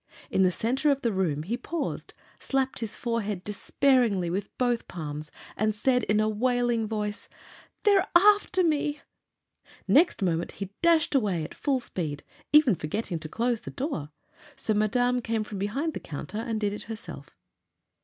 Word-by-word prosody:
In - - +2
the 185 -1 +5
center 255 - 0
of 275 -1 +1
the 235 - +2
room 170 -7 0
he 215 +8 -2
paused, 300 +5 -4 0.2
slapped 265 -1 -1
his 225 -2 -4
forehead 215 -6 -2
despairingly 210 -3 +2
with 200 +3 -2
both 245 -2 0
palms, 150 -3 -6 0.3
and 215 0 0
said 250 +2 +2
in 210 0 +2
a 215 - +2
wailing 240 0 +1
voice: 210 -1 -4 0.5
"They're 400 -3 +4
after 395 0 +5
me!" 295 -2 0 0.9
Next 315 - +4
moment 170 -2 0
he 195 -1 -6
dashed 335 -2 +4
away 200 - +1
at - - -7
full 275 -3 0
speed, 155 - -4 0.3
even 295 -6 +6
forgetting 170 +2 -3
to 155 0 -7
close 235 +4 0
the - - -7
door; 255 - -4 0.5
so 270 -5 -1
Madame 245 +4 +2
came 225 -1 -1
from 210 -2 -7
behind 275 +11 -1
the - - -4
counter 150 +7 -6
and 225 -1 -2
did 205 -1 0
it 210 - -6
herself. 225 0 -8
225 Hz, 165 wpm, -27 LUFS, 195-265 Hz, 0.9 s, even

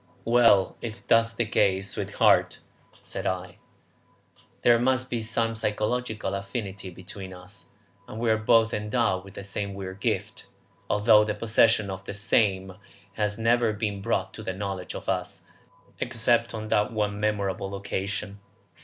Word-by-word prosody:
"Well, 115 -5 +4
if 115 -1 -7
that 115 0 +6
is 115 - -3
the 120 - 0
case, 100 -2 +1
sweetheart," - - +2 0.4
said - - -5
I, 95 -1 -3 1.1
"there 120 -1 +6
must 130 +1 +1
be 120 -2 -1
some 115 +1 0
psychological 110 +1 -1
affinity 100 -1 -5
between 95 +1 -9
us, 90 0 -13 0.4
and 110 - -7
we 115 -1 +2
are 110 - +3
both 115 +1 +3
endowed 105 -3 0
with 95 0 -14
the 100 - -7
same 100 0 -3
weird 95 0 -7
gift, - - -2 0.4
although 105 +1 +5
the 105 -1 -2
possession 110 -2 +3
of 95 0 -7
the 100 - -6
same 100 -2 +1 0.4
has 105 -1 -1
never 115 0 +2
been 105 -2 -3
brought - - -1
to - - -8
the 95 - -3
knowledge 95 -1 -5
of - - -7
us - - -2 0.6
except 120 0 +1
on 110 0 -5
that 105 +2 +2
one 105 -2 -1
memorable 100 -2 -1
occasion. 100 +1 -4
105 Hz, 155 wpm, -26 LUFS, 100-115 Hz, 1.1 s, that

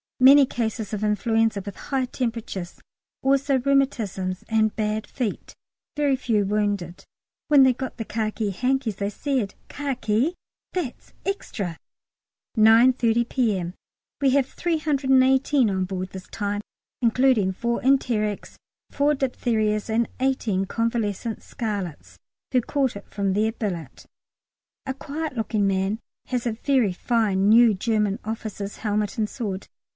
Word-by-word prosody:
Many 275 +2 +8
cases 220 -4 -3
of 210 0 -2
influenza 225 0 +1
with 200 - -6
high 265 -2 -2
temperatures, 230 -8 -4 0.4
also 275 0 +3
rheumatisms 235 -9 0
and 220 -1 +2
bad 215 0 -1
feet, 240 -7 -4 0.4
very 290 -2 +2
few 230 -5 +1
wounded. 205 -4 -1 0.4
When 285 -2 +7
they 260 -1 +5
got 260 +1 -6
the 225 - -4
khaki 215 -1 -2
hankies 250 0 0
they 200 0 -1
said, 245 -2 -2
"Khaki? 275 +1 -1 0.4
that's 330 -10 -4
extra!" 200 - -3 0.8
9.30 230 +1 +5
P.M. 195 -9 0 0.5
We 275 -2 +4
have 270 -1 +3
318 270 -5 +2
on 190 -1 0
board 185 0 -4
this 190 -1 -9
time, 205 -1 -3 0.4
including 235 -4 +3
four 235 +5 -1
enterics, 235 -6 +1 0.4
four 290 +1 +2
diphtherias, 225 -5 0
and 225 +1 +1
eighteen 235 -7 0
convalescent 230 0 -2
scarlets 200 - -5 0.3
(who 255 -2 +3
caught 265 0 0
it 200 - -9
from 195 -1 -1
their 215 +3 +2
billet). 180 - -5 0.8
A 265 - -2
quiet 295 +1 -5
looking 215 -3 0
little 195 -1 +2
man 200 +3 -1 0.3
has 250 -2 -2
a - - +1
very 240 -4 +1
fine 205 -2 +1
new 230 0 +7
German 210 +1 0
officer's 215 -2 -5
helmet 210 -1 -1
and 215 -2 0
sword. 200 -6 -4
225 Hz, 130 wpm, -24 LUFS, 205-260 Hz, 0.8 s, Many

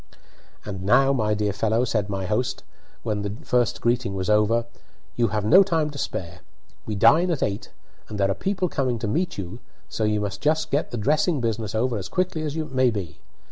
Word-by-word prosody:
"And 95 -3 -5
now, 135 +8 +4
my 105 -5 +1
dear 105 -1 0
fellow," 110 +4 +1
said 105 -4 -1
my 95 -1 -2
host, 110 +6 -1 0.4
when 105 -2 -1
the 100 0 -4
first 125 -6 +1
greeting 120 -4 0
was 95 +2 -1
over, 110 +2 +3 0.5
"you 120 -1 +2
have 105 0 -2
no 185 - +8
time 165 -6 +1
to 140 - -8
spare. 85 -8 -4 0.5
We 105 - -2
dine 165 - +5
at 165 -5 0
eight, 100 +1 -3 0.4
and 105 - -5
there 100 0 +2
are - - +2
people 190 - -1
coming 130 -7 -1
to 110 - -3
meet 170 - -1
you, 95 +4 -6 0.3
so 110 - -2
you 105 0 +1
must 105 0 -4
just 155 +1 +1
get 145 - 0
the 120 - -4
dressing 150 - +2
business 110 -3 -2
over 115 0 0
as 95 - -6
quickly 180 -3 -1
as 150 -1 -3
may 130 -5 +1
be. 100 -8 -5
115 Hz, 205 wpm, -24 LUFS, 105-140 Hz, 0.5 s, no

